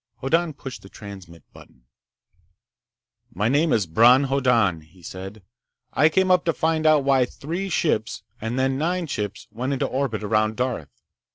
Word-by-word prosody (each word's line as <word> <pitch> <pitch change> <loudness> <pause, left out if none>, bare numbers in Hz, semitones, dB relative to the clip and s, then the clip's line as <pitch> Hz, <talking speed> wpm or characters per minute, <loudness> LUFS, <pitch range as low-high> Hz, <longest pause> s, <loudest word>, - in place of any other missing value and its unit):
Hoddan 165 +4 0
pushed 135 -3 -9
the 95 - -14
transmit 95 -7 -11
button. 60 - -17 1.5
"My 105 +5 +1
name 150 +4 +2
is 105 -4 +2
Bron 120 - +5
Hoddan," 125 - +2
he 85 +3 -21
said. 95 +4 -9 0.5
"I 155 - +4
came 185 +3 +2
up 180 -1 +4
to 165 - +2
find 160 0 0
out 155 -2 +5
why 135 -2 +3
three 170 +10 -5
ships, 115 - -1 0.2
and 115 +3 -3
then 130 0 0
nine 175 +3 -1
ships, 105 -8 -5
went 125 +5 -3
into 135 - -1
orbit 130 -6 -2
around 110 +1 +1
Darth. 125 - -3
125 Hz, 160 wpm, -23 LUFS, 105-155 Hz, 1.5 s, Bron